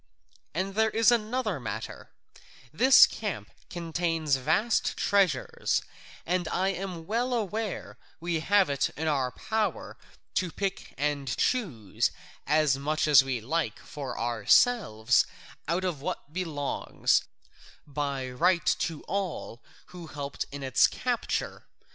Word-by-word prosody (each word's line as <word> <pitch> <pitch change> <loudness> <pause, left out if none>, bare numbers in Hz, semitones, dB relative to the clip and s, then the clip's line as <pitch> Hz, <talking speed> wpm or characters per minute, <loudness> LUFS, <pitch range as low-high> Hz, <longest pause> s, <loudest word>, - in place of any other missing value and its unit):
And 190 +3 -1
there 220 +2 +3
is 225 +2 +4
another 225 - 0
matter: 110 -2 -6 0.6
this 260 +11 +8
camp - - -5 0.2
contains 165 -3 -1
vast 185 - +1
treasures, 190 -10 +1 0.4
and 175 0 0
I 190 +4 0
am 180 -3 -5
well 240 +6 0
aware 215 -1 -3 0.2
we 170 -1 -1
have 200 +3 +3
it 140 -1 0
in 160 +2 -2
our 135 -4 +1
power 220 - -3 0.4
to 180 -3 0
pick 195 +2 -4
and 145 -1 -1
choose 150 - 0 0.4
as 150 -2 +3
much 155 +2 0
as 140 -3 +8
we 130 -3 -2
like 160 +9 -1
for 140 -3 -7
ourselves 115 - +3 0.4
out 170 +4 0
of 175 -7 -2
what 145 +1 -5
belongs 160 -6 0 0.6
by 140 -2 -3
right 170 +7 +2
to 165 -3 -3
all 185 - -4 0.3
who 175 -2 -9
helped 140 -2 -5
in 140 0 -6
its 130 -3 +4
capture. - - -3
165 Hz, 125 wpm, -28 LUFS, 140-195 Hz, 0.6 s, this